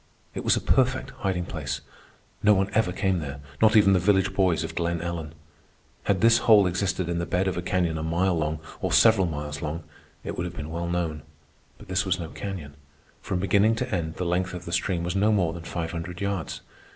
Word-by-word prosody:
It - - -5
was - - +4
a - - -2
perfect 130 0 +1
hiding 90 -3 -1
place. - - -4 0.6
No 105 0 +5
one 95 +1 0
ever 110 -4 +2
came 95 0 0
there, 70 -2 -6 0.2
not 110 0 +5
even 100 -2 +6
the 95 - +4
village 95 +1 +2
boys 90 -4 +2
of 80 0 -5
Glen 85 0 -1
Ellen. 85 -2 -5 0.7
Had 100 -2 +1
this 115 +1 +6
hole 105 -4 +6
existed 90 0 -1
in 85 0 -1
the 85 - -2
bed 95 +1 +1
of 95 - -1
a 90 - -2
canyon 85 -3 0
a - - -3
mile 85 +3 +1
long, 80 -1 -2 0.2
or - - -2
several 110 -5 +5
miles 75 -2 -5
long, 80 +2 -4 0.4
it - - -4
would 85 - -2
have 90 - -9
been 75 +1 -5
well 85 +1 -3
known. 85 -3 -2 0.6
But - - -14
this 95 0 +1
was 95 -1 0
no 85 -2 -5
canyon. 90 -8 -6 0.5
From 95 - -2
beginning 100 +4 +3
to 125 0 -3
end 80 -3 -2
the 90 - -3
length 90 +2 -1
of 90 0 -7
the 85 - -6
stream 90 -3 0
was 90 +2 -2
no 105 +3 +3
more 90 -6 +2
than 85 -1 -8
five 85 -1 -3
hundred 85 +1 -6
yards. 100 -5 -3
90 Hz, 225 wpm, -26 LUFS, 85-95 Hz, 0.7 s, even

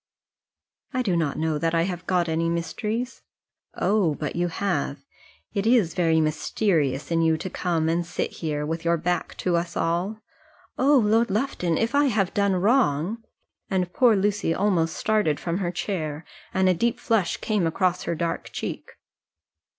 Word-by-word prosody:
"I 255 - +1
do 190 -7 +1
not 160 -4 0
know 155 -1 0
that 165 +1 0
I 165 - +3
have 180 0 -4
got 180 -2 +2
any 165 +1 0
mysteries." 215 +9 -3 0.5
"Oh, 195 -8 +2
but 150 -2 -4
you 175 +1 +1
have! 155 -6 -2 0.5
It 200 +2 0
is 225 -9 +4
very 165 -2 +2
mysterious 155 -2 0
in 165 0 +2
you 160 -1 +3
to 180 +3 -6
come 165 -3 0
and 170 +1 +1
sit 170 - -3
here, 150 -2 -3
with 165 +2 -3
your 170 0 +2
back 175 +2 -2
to 180 -2 +2
us 170 0 -2
all 175 +6 -1 0.3
" - - -31
"Oh, 280 +2 +5
Lord 225 0 +3
Lufton; 190 - 0
if 230 +3 0
I 285 +1 +4
have 205 -8 +1
done 200 -2 +2
wrong 210 - +1 0.2
!" - - -55
and 185 -2 -1
poor 240 -4 +5
Lucy 200 -4 +1
almost 180 -5 +1
started 210 -9 +1
from 170 +2 -2
her 180 -3 -1
chair, 165 -5 -3 0.3
and 190 0 +2
a 185 - +5
deep 230 +7 0
flush 215 -7 +1
came 210 -6 0
across 180 +2 0
her 170 - -2
dark 170 +1 -3
cheek. - - -5
175 Hz, 175 wpm, -25 LUFS, 165-210 Hz, 0.5 s, Oh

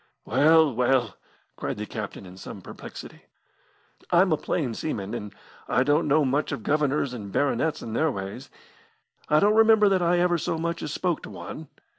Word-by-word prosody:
"Well, 155 +4 +4
well!" 125 -2 +1 0.4
cried - - -4
the 105 - -4
captain 105 -2 -7
in 90 0 -12
some 95 0 -9
perplexity, - - -10 0.8
"I'm 180 +1 +4
a - - +5
plain 135 -7 -2
seaman, 105 -7 -4
and 105 0 -5 0.4
I 125 - +2
don't 145 +4 +2
know 150 +1 +3
much 140 +3 0
of 110 - -4
governors 145 -2 0
and 105 -5 -7
baronets 155 +4 0
and 115 -1 -5
their 160 +4 +2
ways. 95 -6 -6 0.8
I 150 - +5
don't 205 +4 +4
remember 220 -1 +6
that 190 -2 +2
I 175 +1 +3
ever 175 -1 +2
so 165 - -2
much 170 +1 -3
as - - -4
spoke 175 0 -1
to - - -9
one. 155 0 -8
150 Hz, 180 wpm, -25 LUFS, 115-170 Hz, 0.8 s, remember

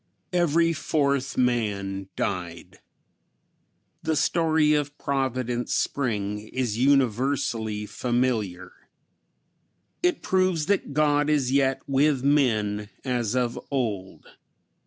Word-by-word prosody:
Every 170 -1 +3
fourth 140 -4 0
man 100 -6 -1
died! 85 -3 -4 1.2
The 160 0 0
story 160 -1 +2
of 145 -1 -1
"Providence 130 -3 -1
Spring" 105 -5 -2
is 120 -4 -2
universally 125 -4 +1
familiar. 110 -5 -1 1.3
It 355 0 +1
proves 185 -4 +1
that 195 -6 0
God 145 0 +2
is 140 -4 +1
yet 135 -1 +2
with 140 -1 +2
men 110 -8 +1 0.2
as 125 -3 -1
of 120 -2 0
old. 110 -9 -3
130 Hz, 95 wpm, -25 LUFS, 110-145 Hz, 1.3 s, Every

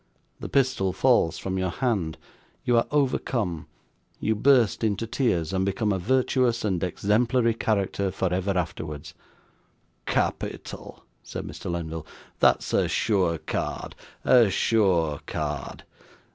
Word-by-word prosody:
The - - -6
pistol 130 -9 +1
falls 105 -6 +3
from 95 0 -3
your 95 0 0
hand 95 - -1 0.5
you 120 - +3
are 115 - +3
overcome 125 - 0 0.5
you 110 - +1
burst 120 -1 +3
into 110 0 0
tears, 95 - 0
and 95 0 +1
become 100 +2 0
a 95 - -1
virtuous 125 +2 +1
and 95 -4 0
exemplary 115 +6 +2
character 100 -3 0
for 95 -1 -1
ever 95 +1 0
afterwards.' 80 -4 -4 0.9
'Capital!' - - -3 0.2
said - - -7
Mr. - - -7
Lenville: 80 -2 -4 0.3
'that's - - +3
a - - +3
sure 95 -6 +1
card, - - -4 0.3
a 120 -5 +6
sure 90 -8 +2
card. 75 -2 -4
100 Hz, 125 wpm, -26 LUFS, 85-115 Hz, 0.9 s, a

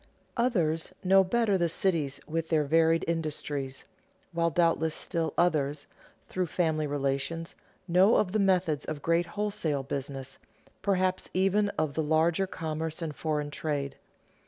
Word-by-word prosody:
Others 180 -10 +1
know 195 +1 +6
better 205 0 +2
the 170 -1 +2
cities 160 -6 0
with 165 +1 -2
their 155 -2 +3
varied 165 +2 +3
industries; 145 -4 -3 0.5
while 170 -1 +1
doubtless 165 -1 +2
still 165 -4 -2
others, 150 -4 +1 0.4
through 185 -1 -1
family 155 -2 0
relations, 145 +4 -2 0.3
know 185 +5 +5
of 185 - +2
the 215 - +1
methods 180 -6 +2
of 150 -2 -5
great 170 +1 +2
wholesale 200 -7 -2
business, 135 -1 -5 0.4
perhaps 185 -2 0
even 195 +2 +3
of 155 -2 0
the 160 - 0
larger 160 +5 +2
commerce 160 -2 -4
and 160 -4 -4
foreign 150 -2 -2
trade. 145 -3 -3
165 Hz, 135 wpm, -29 LUFS, 150-185 Hz, 0.5 s, know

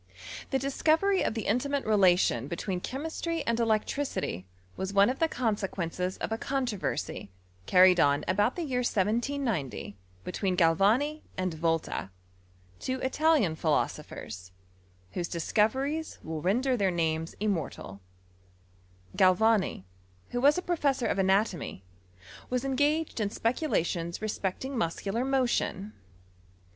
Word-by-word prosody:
The 270 - +1
discovery 320 +8 +2
of - - -1
the 225 - -3
intimate 275 +6 0
relation 180 - +3
between 180 +3 -3
chemistry 320 - -3
and 230 0 0
electricity 220 - -1 0.3
was 190 +1 -4
one 200 +4 +5
of 265 - -7
the 325 - +2
conse* 230 -6 -1
quesDces 180 +1 -3
of - - -4
a 225 - -1
controversy 245 - -2 0.4
carried 185 -1 +6
on 145 -2 +3
about 205 +6 +2
the 350 - -3
year 260 -5 -1
1790 225 - -1 0.3
between 185 0 -2
Galvani 210 - +3 0.2
aiid 185 -2 -1
Volta, 165 - -1 0.7
two 260 0 -2
ItaHan 260 - +2
phi* 160 - -5
losophers, 90 -10 -2 0.6
whose 175 -1 -3
discoveries 260 - 0
will 160 -1 -4
render 250 - +2
their 200 -5 +2
names 165 -2 -1
iaimortaL 165 - -3 1.2
GiaWani, 190 - +3 0.5
who 245 - -1
was 290 +4 +5
a 360 - -2
professor 285 -8 0
of - - 0
anatomy^ 190 - +1 0.7
iMus 250 0 0
esfegaged 290 +3 0
in. 210 -2 0
speculations 185 - -1
respecting 215 +4 -3
musetdar 205 +2 -1
motion. 240 -6 0
215 Hz, 120 wpm, -29 LUFS, 180-265 Hz, 1.2 s, carried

